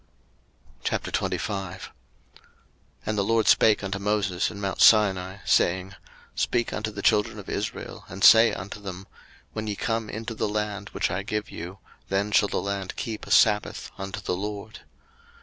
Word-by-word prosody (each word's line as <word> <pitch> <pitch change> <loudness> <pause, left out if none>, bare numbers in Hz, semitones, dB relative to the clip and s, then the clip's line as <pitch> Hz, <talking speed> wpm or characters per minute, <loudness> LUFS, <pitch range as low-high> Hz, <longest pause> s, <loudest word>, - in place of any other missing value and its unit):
03:025:001 95 -3 -2 1.2
And 110 0 -1
the - - +2
LORD 115 +1 +2
spake 105 -2 +5
unto 100 0 -3
Moses 100 -3 0
in 100 - -9
mount 100 -2 -2
Sinai, 95 -3 +5
saying, 95 +2 +2
03:025:002 - - -13 0.4
Speak 120 -1 0
unto 105 0 -2
the 105 -1 -7
children 105 -2 +2
of - - -9
Israel, - - -5
and 95 0 -6
say 115 +4 +8
unto 95 +3 -6
them, 95 -1 -7 0.5
When 110 0 -4
ye 105 - -2
come 115 0 -2
into 115 +2 -5
the 110 - -2
land 105 -1 -3
which - - -1
I 95 +3 -1
give 105 +1 -4
you, 90 +4 -7 0.3
then 100 +2 0
shall 105 -1 +4
the - - -1
land 100 -1 -4
keep 110 -2 -5
a - - -8
sabbath 105 -1 +3
unto 95 +1 -6
the 90 - -2
LORD. 105 +2 -6
100 Hz, 165 wpm, -26 LUFS, 95-105 Hz, 1.2 s, say